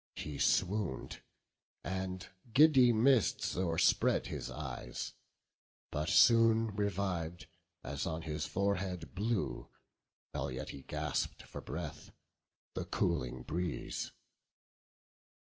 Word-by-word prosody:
He 75 -2 -5
swoon'd, 95 -7 0 0.6
and 95 0 -3 0.2
giddy 135 -1 +7
mists 120 0 +3
o'erspread 85 -3 +2
his - - -5
eyes: - - -5 0.8
But 75 +2 -1
soon 115 -1 +6
reviv'd, 95 -5 -2 0.4
as 70 +2 -3
on 80 0 -3
his 75 -1 -3
forehead 95 -3 -1
blew, 100 - -1 0.6
While 70 - -2
yet 65 0 -5
he 70 - -8
gasp'd - - -2
for - - -8
breath, - - -6 0.6
the - - -3
cooling 65 0 -1
breeze. 85 +5 -3
90 Hz, 95 wpm, -34 LUFS, 80-105 Hz, 0.8 s, giddy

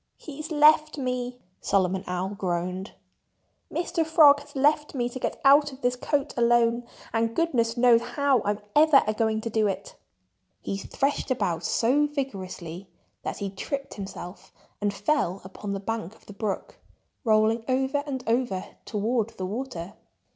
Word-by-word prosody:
"He's 305 0 -8
left 305 0 +5
me!" 250 -2 -3 0.2
Solomon 190 -1 +1
Owl 180 +1 -2
groaned. 185 -1 -3 0.8
"Mr. 335 -1 0
Frog 310 -3 +6
has 285 0 -15
left 295 +2 +2
me 240 -2 0
to 245 +1 -6
get - - -3
out 285 +1 +6
of 265 +1 -13
this 245 0 +1
coat 280 +2 -1
alone. 235 0 +3 0.3
And 225 0 0
goodness 240 -8 +1
knows 240 -1 +6
how 265 +1 +1
I'm 205 +1 -1
ever 300 -2 +6
a 215 - 0
going 220 0 0
to 230 - -4
do 220 -1 +2
it." 195 0 -4 0.7
He 195 - -4
threshed 275 +9 -1
about 175 -10 -1
so 260 - +2
vigorously 190 - -5 0.3
that - - -4
he 200 -1 -4
tripped 275 +8 -5
himself 190 -2 -8 0.3
and 205 0 +1
fell 200 - 0
upon 195 +2 -7
the 195 - -3
bank 220 -1 -4
of - - -23
the 205 - -11
brook, 200 -1 -4 0.4
rolling 220 0 +3
over 265 +2 +1
and 260 -3 -4
over 225 -5 0 0.2
toward 225 +1 0
the 185 - -3
water. 205 -4 -5
235 Hz, 155 wpm, -26 LUFS, 200-275 Hz, 0.8 s, Frog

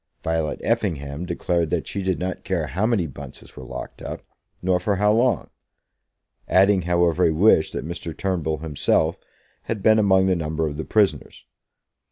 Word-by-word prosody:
Violet 80 -2 -1
Effingham 70 +2 -2
declared 85 -1 -1
that - - -1
she 100 - -4
did 95 -2 0
not 90 0 -4
care 85 -5 -1
how 95 +8 -1
many 110 -7 +1
Bunces 70 -2 -11
were - - -9
locked - - -8
up; - - -6 0.4
nor 90 0 +2
for 100 +3 0
how 105 +2 +3
long, 120 -3 +1 1.0
adding, 95 +1 +4
however, 85 0 +2
a 80 - +3
wish 80 0 +4
that - - -5
Mr. 85 -1 -6
Turnbull 85 -5 -1
himself 80 +1 +1 0.5
had 105 -4 -4
been 110 0 +5
among 95 -2 +4
the 95 -1 +2
number 80 -1 -2
of 75 -1 -5
the 80 - -4
prisoners. 105 -3 0
90 Hz, 170 wpm, -23 LUFS, 80-95 Hz, 1.0 s, been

